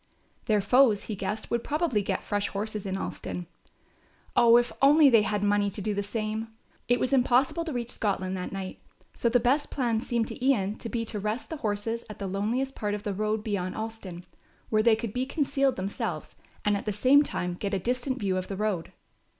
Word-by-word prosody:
Their 210 Hz, -3 st, +3 dB
foes, 225 Hz, 0 st, +4 dB
he 215 Hz, -, -4 dB
guessed, 205 Hz, +3 st, -4 dB
would 235 Hz, 0 st, 0 dB
probably 300 Hz, -8 st, 0 dB
get 200 Hz, -, -2 dB
fresh 205 Hz, -1 st, -1 dB
horses 210 Hz, 0 st, -4 dB
in 190 Hz, 0 st, -2 dB
Alston. 180 Hz, -2 st, -5 dB, 0.9 s
Oh, 235 Hz, 0 st, +7 dB
if 240 Hz, 0 st, +2 dB
only 285 Hz, +1 st, +7 dB
they 225 Hz, -2 st, +7 dB
had 210 Hz, -1 st, -1 dB
money 205 Hz, 0 st, +2 dB
to 200 Hz, -, -7 dB
do 210 Hz, +1 st, -1 dB
the 200 Hz, -, -1 dB
same! 215 Hz, +2 st, -3 dB, 0.4 s
It 245 Hz, 0 st, +3 dB
was 255 Hz, -, 0 dB
impossible 265 Hz, +5 st, +3 dB
to 325 Hz, -, -3 dB
reach 240 Hz, -2 st, -3 dB
Scotland 190 Hz, -4 st, -1 dB
that 180 Hz, -1 st, -4 dB
night, 190 Hz, -1 st, -6 dB, 0.3 s
so 235 Hz, -, 0 dB
the 245 Hz, +1 st, +4 dB
best 270 Hz, +5 st, +2 dB
plan 235 Hz, -5 st, 0 dB
seemed 235 Hz, -2 st, -1 dB
to -, -, -7 dB
Ian 215 Hz, -6 st, +1 dB
to 230 Hz, -, -5 dB
be 230 Hz, 0 st, -2 dB
to 215 Hz, -1 st, -4 dB
rest 215 Hz, +4 st, -3 dB
their 320 Hz, -, -4 dB
horses 225 Hz, +1 st, -2 dB
at 210 Hz, -, -8 dB
the 200 Hz, -, -5 dB
loneliest 220 Hz, +8 st, -1 dB
part 210 Hz, -4 st, -2 dB
of 205 Hz, -, -7 dB
the 205 Hz, -3 st, -2 dB
road 215 Hz, +2 st, -1 dB
beyond 195 Hz, -4 st, -2 dB
Alston, 220 Hz, -6 st, -6 dB, 0.4 s
where 215 Hz, -1 st, +3 dB
they 225 Hz, 0 st, +5 dB
could 220 Hz, -2 st, -5 dB
be 255 Hz, +1 st, -1 dB
concealed 275 Hz, -2 st, +1 dB
themselves 190 Hz, +2 st, -4 dB, 0.3 s
and 210 Hz, 0 st, +3 dB
at 200 Hz, -, -4 dB
the -, -, +2 dB
same 255 Hz, +8 st, +5 dB
time 180 Hz, -11 st, -2 dB
get 195 Hz, +3 st, -4 dB
a 195 Hz, -, +1 dB
distant 250 Hz, +6 st, -1 dB
view 190 Hz, -3 st, 0 dB
of 185 Hz, -, -3 dB
the 195 Hz, -, -5 dB
road. 205 Hz, -5 st, -1 dB
215 Hz, 215 wpm, -28 LUFS, 200-245 Hz, 0.9 s, Oh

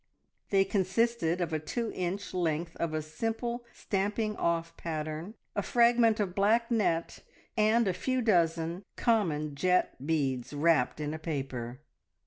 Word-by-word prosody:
They 195 Hz, -1 st, +4 dB
consisted 195 Hz, -3 st, +1 dB
of 170 Hz, -2 st, -1 dB
a 155 Hz, -, +1 dB
two 225 Hz, +9 st, -3 dB
inch 185 Hz, +3 st, -3 dB
length 170 Hz, -1 st, -1 dB
of 170 Hz, -1 st, -1 dB
a 155 Hz, -, -1 dB
simple 225 Hz, +8 st, -3 dB
stamping 210 Hz, +2 st, -1 dB
off 165 Hz, -2 st, -1 dB
pattern, 155 Hz, +4 st, -4 dB, 0.2 s
a 205 Hz, -, +1 dB
fragment 235 Hz, 0 st, +4 dB
of 195 Hz, -4 st, 0 dB
black 225 Hz, +5 st, +2 dB
net, 170 Hz, -7 st, +1 dB, 0.4 s
and 220 Hz, +1 st, +3 dB
a 185 Hz, -, +2 dB
few 255 Hz, +7 st, -1 dB
dozen 170 Hz, -3 st, +1 dB
common 160 Hz, -10 st, +1 dB
jet 180 Hz, -2 st, +1 dB
beads, 140 Hz, -5 st, -1 dB
wrapped 150 Hz, -2 st, +2 dB
in 150 Hz, 0 st, -2 dB
a 160 Hz, -, -5 dB
paper. 135 Hz, -5 st, -4 dB
175 Hz, 140 wpm, -30 LUFS, 155-215 Hz, 0.4 s, They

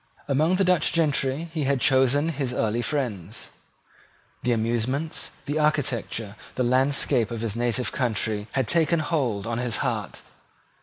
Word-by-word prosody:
Among 155 Hz, +6 st, +2 dB
the 195 Hz, -, +2 dB
Dutch 180 Hz, -4 st, +3 dB
gentry 150 Hz, -1 st, +1 dB
he 155 Hz, -4 st, -1 dB
had 140 Hz, 0 st, +1 dB
chosen 135 Hz, +5 st, +3 dB
his 135 Hz, -5 st, -2 dB
early 110 Hz, +1 st, 0 dB
friends. 115 Hz, -, -3 dB, 0.9 s
The 125 Hz, -, 0 dB
amusements, 120 Hz, +7 st, -1 dB, 0.2 s
the 150 Hz, +2 st, -1 dB
architecture, 125 Hz, -8 st, -1 dB, 0.2 s
the 130 Hz, -, 0 dB
landscape 130 Hz, -1 st, +2 dB
of 115 Hz, -2 st, -5 dB
his 115 Hz, -2 st, -2 dB
native 120 Hz, 0 st, 0 dB
country, 110 Hz, -4 st, -1 dB
had 130 Hz, -4 st, 0 dB
taken 170 Hz, 0 st, +3 dB
hold 135 Hz, -10 st, -1 dB
on 115 Hz, 0 st, -2 dB
his 125 Hz, -2 st, -1 dB
heart. -, -, -3 dB
130 Hz, 145 wpm, -25 LUFS, 115-150 Hz, 0.9 s, Dutch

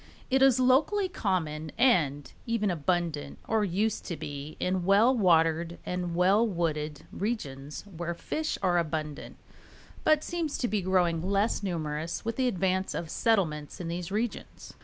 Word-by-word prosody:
It 265 Hz, 0 st, +3 dB
is 265 Hz, -2 st, +6 dB
locally 295 Hz, +11 st, +3 dB
common 160 Hz, -, -2 dB
and 150 Hz, -, +2 dB
even 220 Hz, -4 st, +1 dB
abundant, 170 Hz, -2 st, -1 dB
or 220 Hz, -1 st, +2 dB
used 205 Hz, +3 st, 0 dB
to 170 Hz, -, -4 dB
be, 145 Hz, +1 st, -7 dB
in 180 Hz, 0 st, 0 dB
well 205 Hz, +7 st, +5 dB
watered 170 Hz, -4 st, +3 dB
and 180 Hz, -1 st, -3 dB
well 195 Hz, +6 st, +4 dB
wooded 155 Hz, -6 st, -2 dB
regions 150 Hz, -, -4 dB
where 170 Hz, -3 st, -5 dB
fish 310 Hz, -, -3 dB
are 175 Hz, -2 st, +3 dB
abundant, 155 Hz, -2 st, -4 dB, 0.7 s
but 310 Hz, -1 st, +4 dB
seems 335 Hz, -4 st, -2 dB
to 245 Hz, -, 0 dB
be 210 Hz, -3 st, 0 dB
growing 175 Hz, -3 st, +2 dB
less 200 Hz, +5 st, +1 dB
numerous 160 Hz, -3 st, -3 dB
with 230 Hz, 0 st, -2 dB
the 260 Hz, -1 st, +2 dB
advance 190 Hz, -3 st, 0 dB
of 165 Hz, -2 st, -4 dB
settlements 160 Hz, -10 st, 0 dB
in 170 Hz, -2 st, -4 dB
these 175 Hz, +2 st, -4 dB
regions. 220 Hz, +2 st, -4 dB
180 Hz, 150 wpm, -29 LUFS, 160-220 Hz, 0.7 s, is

